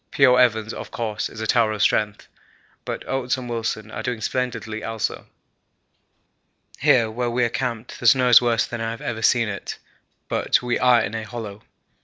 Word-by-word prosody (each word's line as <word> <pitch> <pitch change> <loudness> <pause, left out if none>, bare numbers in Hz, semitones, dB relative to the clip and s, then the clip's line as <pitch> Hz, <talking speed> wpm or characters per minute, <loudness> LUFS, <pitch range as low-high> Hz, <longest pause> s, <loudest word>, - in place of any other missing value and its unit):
P.O. 130 -3 +5
Evans, 110 -3 +2
of - - -7
course, 110 -3 -3
is 110 - -9
a - - -2
tower 115 0 +3
of 105 - -4
strength, 105 -1 0 0.6
but - - -5
Oates 135 0 -1
and 125 -1 -7
Wilson 110 -2 -3
are - - -5
doing 120 -3 -3
splendidly 110 -2 -3
also. 115 -1 -3 1.5
Here 115 -3 +3
where 120 +2 -2
we 120 +1 0
are 120 - +2
camped 120 -1 -4
the 120 - 0
snow 125 +1 +5
is 120 - +8
worse 120 -2 +2
than 120 -1 -6
I 115 - -2
have 115 0 -6
ever 110 -1 -4
seen 115 +1 +3
it, 100 -1 -5 0.5
but - - +1
we 120 -1 0
are 125 -2 +5
in 105 - -4
a 115 - -3
hollow. 110 -2 -7
115 Hz, 190 wpm, -22 LUFS, 110-125 Hz, 1.5 s, is